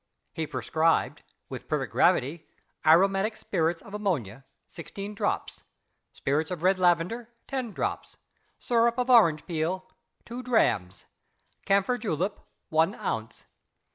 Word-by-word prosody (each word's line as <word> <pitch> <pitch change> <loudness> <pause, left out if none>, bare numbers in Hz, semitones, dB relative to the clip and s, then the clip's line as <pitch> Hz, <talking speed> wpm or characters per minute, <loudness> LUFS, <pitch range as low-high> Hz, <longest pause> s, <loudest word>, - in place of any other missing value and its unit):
He 160 -1 -3
prescribed, 160 +2 +1 0.3
with - - -8
perfect - - -2
gravity: 155 +6 +2 0.4
Aromatic 195 +6 +4
Spirits 165 -5 -1
of 200 - -13
Ammonia 135 - -2 0.2
16 195 +5 -8
drops. 205 0 -2 0.5
Spirits 150 +3 -1
of 180 -3 -5
Red 185 +1 +3
Lavender 180 +7 +1 0.2
10 255 -4 -3
drops. - - -4 0.4
Syrup 235 0 +2
of 250 0 +1
Orange 170 -11 +5
Peel 175 +2 -2 0.4
2 240 +2 -6
drams. 160 - +1 0.6
Camphor 200 +5 +2
Julep 195 -2 -2 0.3
1 160 +1 +2
ounce. 110 0 -4
185 Hz, 115 wpm, -27 LUFS, 160-215 Hz, 0.6 s, Orange